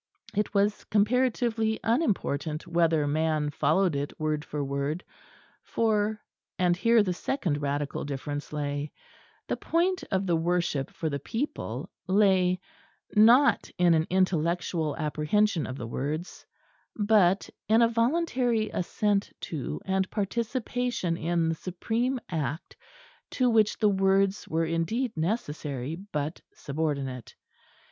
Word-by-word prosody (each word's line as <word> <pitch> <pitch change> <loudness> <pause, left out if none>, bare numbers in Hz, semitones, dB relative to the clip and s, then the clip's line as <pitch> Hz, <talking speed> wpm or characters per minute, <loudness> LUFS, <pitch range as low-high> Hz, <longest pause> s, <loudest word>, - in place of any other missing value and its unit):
It 210 +1 0
was 200 +1 +2
comparatively 225 0 +1
unimportant 185 - 0
whether 165 -3 +2
man 155 0 0
followed 185 +2 +2
it 140 +1 -4
word 155 -1 -1
for 145 -2 -4
word, 140 +5 -2 0.6
for 215 -1 0 0.4
(and 180 -2 +3
here 230 +3 +4
the 185 -3 -1
second 175 - -2
radical 145 0 -2
difference 145 +1 -5
lay) 145 0 -3 0.6
the - - -1
point 360 +3 0
of 190 -1 0
the 175 -3 +2
worship 165 -4 0
for 160 - -4
the 140 -2 -2
people 230 - -4 0.2
lay, 185 -2 +3 0.6
not 235 +7 +6
in 175 -1 +5
an 160 0 +2
intellectual 170 -3 0
apprehension 160 +4 +1
of 130 - -6
the 120 - -5
words, 150 +9 -4 0.5
but 205 -3 +3 0.2
in 225 +2 +6
a - - +6
voluntary 235 -2 +1
assent 200 +3 0
to 150 -6 -4
and 190 -1 0
participation 235 -2 -1
in 170 0 0
the 165 - +1
supreme 225 +10 -2
act 160 -1 -4 0.5
to 250 -2 +2
which 215 -2 +3
the 215 - +3
words 195 0 +2
were 165 +1 0
indeed 190 +10 -1
necessary 150 - -2
but 165 -5 -4
subordinate. 140 -4 -3
180 Hz, 125 wpm, -28 LUFS, 155-220 Hz, 0.6 s, not